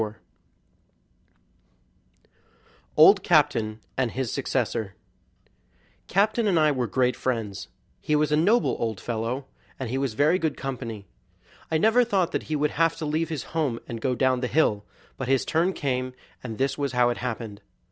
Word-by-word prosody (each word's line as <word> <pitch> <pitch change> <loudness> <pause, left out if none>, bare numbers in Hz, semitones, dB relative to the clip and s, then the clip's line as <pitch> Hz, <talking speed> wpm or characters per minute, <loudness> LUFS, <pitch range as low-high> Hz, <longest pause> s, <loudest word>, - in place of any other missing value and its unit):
44 110 0 -4 2.8
Old 195 +6 +8
Captain 145 - +2 0.2
and 125 - 0
His 130 0 -3
Successor 115 -7 -2 1.1
Captain 215 +4 +2
and 180 -5 +3
I 155 -1 +4
were 125 -4 -1
great 125 +3 +1
friends. 110 -6 -3 0.3
He 150 - 0
was 150 -1 +1
a - - +4
noble 205 +10 +3
old 110 -3 -2
fellow, 120 +3 -3 0.3
and 130 -4 -4
he 135 - -1
was 135 -5 -2
very 155 +8 +3
good 160 -2 -1
company. 120 -6 -5 0.6
I 160 - +2
never 225 +8 +4
thought 190 -7 +1
that - - -3
he 155 - 0
would 150 0 +1
have 165 -1 +2
to 165 - -4
leave 155 +2 -1
his 155 -5 -3
home 145 -8 0
and 115 -1 -6
go 125 +1 0
down 130 0 +2
the 125 - -1
hill; 110 -9 +1 0.3
but 130 - -4
his 135 0 +2
turn 170 +4 +1
came, 130 -6 -2 0.3
and 115 -4 -6
this 135 +1 -1
was 140 -2 -1
how 125 -1 +3
it 120 - -4
happened. 115 -4 -5
135 Hz, 165 wpm, -25 LUFS, 120-160 Hz, 2.8 s, Old